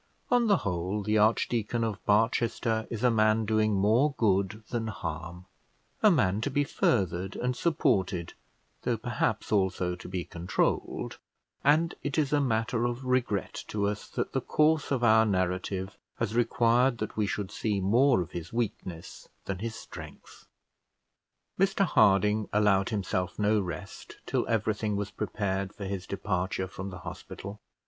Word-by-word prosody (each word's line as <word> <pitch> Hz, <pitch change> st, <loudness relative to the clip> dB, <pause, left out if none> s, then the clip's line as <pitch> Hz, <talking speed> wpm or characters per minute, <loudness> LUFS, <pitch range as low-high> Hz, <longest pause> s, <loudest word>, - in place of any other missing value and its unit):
On 245 Hz, -1 st, +4 dB
the 200 Hz, -2 st, +5 dB
whole, 90 Hz, +3 st, -1 dB
the 105 Hz, +1 st, +2 dB
Archdeacon 115 Hz, +1 st, +1 dB
of 110 Hz, -3 st, -3 dB
Barchester 110 Hz, +1 st, +1 dB
is 115 Hz, 0 st, -4 dB
a 125 Hz, -, +5 dB
man 110 Hz, 0 st, +3 dB
doing 110 Hz, -1 st, +2 dB
more 115 Hz, +9 st, +3 dB
good 100 Hz, 0 st, +1 dB
than 115 Hz, -2 st, -1 dB
harm, 85 Hz, -2 st, -6 dB, 0.6 s
a 215 Hz, -, +7 dB
man 110 Hz, -, +2 dB
to 140 Hz, -, -1 dB
be 145 Hz, +1 st, +1 dB
furthered 95 Hz, -, 0 dB
and 125 Hz, 0 st, -1 dB
supported, 95 Hz, -, 0 dB, 0.5 s
though -, -, 0 dB
perhaps -, -, -2 dB
also 95 Hz, -3 st, +1 dB
to 90 Hz, -, -10 dB
be 90 Hz, -2 st, -3 dB
controlled; 85 Hz, +1 st, -2 dB, 0.4 s
and 155 Hz, +4 st, +3 dB
it 145 Hz, +1 st, -3 dB
is 150 Hz, -3 st, +1 dB
matter 120 Hz, -4 st, +1 dB
of 120 Hz, +2 st, -3 dB
regret 125 Hz, -6 st, -1 dB
to 105 Hz, -1 st, -1 dB
us 105 Hz, 0 st, -3 dB
that -, -, -3 dB
the 135 Hz, -, 0 dB
course 155 Hz, +3 st, +2 dB
of 130 Hz, -3 st, 0 dB
our 110 Hz, -1 st, +6 dB
narrative 95 Hz, -1 st, -1 dB, 0.2 s
has 115 Hz, -2 st, -2 dB
required 120 Hz, +1 st, +3 dB
that 105 Hz, -1 st, -4 dB
we 105 Hz, -2 st, +1 dB
should 100 Hz, -1 st, -3 dB
see 105 Hz, -3 st, -1 dB
more 120 Hz, +4 st, +4 dB
of 90 Hz, +1 st, -6 dB
his 85 Hz, 0 st, -6 dB
weakness 95 Hz, -7 st, -4 dB, 0.2 s
than 95 Hz, -2 st, -3 dB
his 115 Hz, +2 st, -4 dB
strength. 115 Hz, -, -11 dB, 1.1 s
Mr 195 Hz, +1 st, +3 dB
Harding 105 Hz, -, +3 dB
allowed 105 Hz, -2 st, +3 dB
himself 95 Hz, -4 st, -2 dB
no 105 Hz, +1 st, +3 dB
rest 90 Hz, -6 st, -7 dB
till -, -, -1 dB
everything 110 Hz, -1 st, 0 dB
was 100 Hz, 0 st, -3 dB
prepared 100 Hz, -2 st, -2 dB
for 100 Hz, -, -6 dB
his 95 Hz, -1 st, -4 dB
departure 95 Hz, -1 st, -2 dB
from 95 Hz, +1 st, -7 dB
the 90 Hz, -, -8 dB
hospital. 95 Hz, +4 st, -8 dB
105 Hz, 155 wpm, -29 LUFS, 95-120 Hz, 1.1 s, a